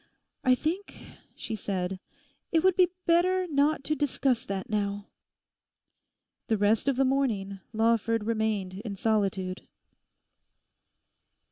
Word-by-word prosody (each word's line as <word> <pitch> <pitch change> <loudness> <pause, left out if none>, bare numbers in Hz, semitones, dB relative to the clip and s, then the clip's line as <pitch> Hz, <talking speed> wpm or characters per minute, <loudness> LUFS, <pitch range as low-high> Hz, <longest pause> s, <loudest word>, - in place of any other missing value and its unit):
'I 255 0 +5
think,' 335 +10 -3 0.4
she 225 - -5
said, 190 -2 -3 0.5
'it 325 -1 +3
would 375 -1 +4
be 365 -2 +5 0.2
better 365 +2 +3
not 290 -2 +1
to 305 - 0
discuss 270 -3 0
that 195 -1 -3
now.' 205 -1 -2 1.4
The 220 - +2
rest 205 +5 +2
of 275 - +3
the 270 +1 +3
morning 220 -8 0
Lawford 230 0 +1
remained 215 -4 -1
in 210 -4 -5
solitude. 195 -3 -1
225 Hz, 115 wpm, -28 LUFS, 200-280 Hz, 1.4 s, I